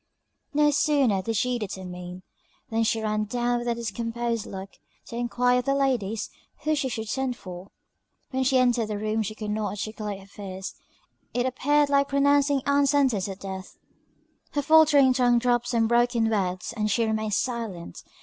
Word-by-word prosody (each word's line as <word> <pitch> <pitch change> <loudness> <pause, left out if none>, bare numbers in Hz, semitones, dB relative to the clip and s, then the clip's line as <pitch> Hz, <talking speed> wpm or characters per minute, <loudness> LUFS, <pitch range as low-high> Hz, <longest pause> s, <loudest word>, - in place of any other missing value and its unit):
No 295 0 +3
sooner 275 -9 +2
did 225 +4 -3
she 245 +3 0
determine, 180 -3 -7 0.5
than 225 0 +1
she 225 0 +1
ran 215 0 0
down 240 +2 0
with 240 - -5
a 235 - +1
discomposed 230 0 -3
look, 190 0 -7 0.3
to - - -9
enquire 245 +1 +2
of 250 - -4
the 275 - +2
ladies 235 -7 0 0.3
who 310 - +1
she 275 -3 0
should 225 -2 -4
send 260 +1 -2
for. 185 +1 -9 0.6
When 260 0 0
she 265 0 +3
entered 245 -3 +3
the 210 -1 -3
room 215 +1 -1
she 215 0 -4
could 210 -1 -4
not 210 0 -1
articulate 210 -1 -5
her - - -14
fears 195 -1 -7 0.6
it 245 0 +1
appeared 290 +3 +2
like 280 0 +3
pronouncing 280 0 +3
Ann's 280 0 +3
sentence 265 -9 +2
of 195 -1 -6
death; 190 -1 -8 0.8
her 290 - 0
faultering 295 -3 +6
tongue 245 -1 +3
dropped 240 0 +1
some 230 -2 +2
broken 235 -1 +2
words, 185 0 -1
and 215 -1 0
she 230 +2 +2
remained 220 -2 -1
silent. 225 - -4
235 Hz, 175 wpm, -26 LUFS, 210-260 Hz, 0.8 s, faultering